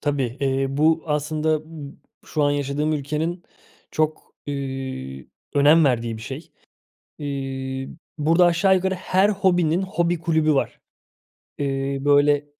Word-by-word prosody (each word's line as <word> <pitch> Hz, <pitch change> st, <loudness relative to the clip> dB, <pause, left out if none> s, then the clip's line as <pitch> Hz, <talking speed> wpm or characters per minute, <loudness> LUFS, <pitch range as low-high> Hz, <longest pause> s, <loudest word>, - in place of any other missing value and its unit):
Tabii. 135 Hz, -4 st, -1 dB
Eee, 135 Hz, 0 st, +1 dB
bu 160 Hz, +2 st, +3 dB
aslında 155 Hz, +1 st, 0 dB
b 155 Hz, -3 st, -9 dB, 0.3 s
şu 150 Hz, -, -1 dB
an 145 Hz, -, +3 dB
yaşadığım 145 Hz, +2 st, -1 dB
ülkenin 155 Hz, +4 st, -2 dB, 0.5 s
çok, 155 Hz, 0 st, -2 dB
üüü, 130 Hz, -, -5 dB, 0.3 s
önem 150 Hz, +3 st, +6 dB
verdiği 120 Hz, -4 st, 0 dB
bir 110 Hz, -, -9 dB
şey. 135 Hz, +7 st, -8 dB, 0.7 s
İii, 135 Hz, -2 st, -4 dB, 0.3 s
burada 165 Hz, +4 st, +4 dB
aşağı 190 Hz, +3 st, +4 dB
yukarı 190 Hz, +1 st, 0 dB
her 185 Hz, +2 st, +2 dB
hobinin 180 Hz, -4 st, +2 dB
hobi 175 Hz, -3 st, 0 dB
kulübü 160 Hz, -2 st, +2 dB
var. 135 Hz, -, -1 dB, 0.8 s
Eee, 135 Hz, -1 st, -1 dB
böyle, 145 Hz, 0 st, +4 dB
150 Hz, 125 wpm, -23 LUFS, 135-165 Hz, 0.8 s, önem